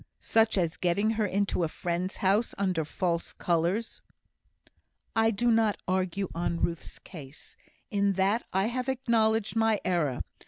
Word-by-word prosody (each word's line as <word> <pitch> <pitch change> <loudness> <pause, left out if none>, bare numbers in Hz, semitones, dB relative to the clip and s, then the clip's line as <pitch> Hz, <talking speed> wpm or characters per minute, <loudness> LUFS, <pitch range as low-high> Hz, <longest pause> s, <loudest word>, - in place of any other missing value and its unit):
"Such 225 -2 +2
as 170 -3 0
getting 200 +5 +1
her 215 -1 0
into 195 -1 0
a - - +2
friend's 175 +4 -3
house 200 +4 +1
under 185 -5 0
false 170 +2 -2
colours." 175 +6 -1 1.1
"I 225 0 +4
do 235 +2 +1
not 225 -2 +3
argue 185 +1 0
on 170 0 -1
Ruth's 170 -1 -3
case. 150 -5 -10 0.4
In 200 -1 +2
that 195 +5 +2
I 190 +1 +2
have 250 +3 -2
acknowledged 225 -4 +1
my 225 -2 +3
error. 165 -8 0
195 Hz, 145 wpm, -28 LUFS, 175-225 Hz, 1.1 s, I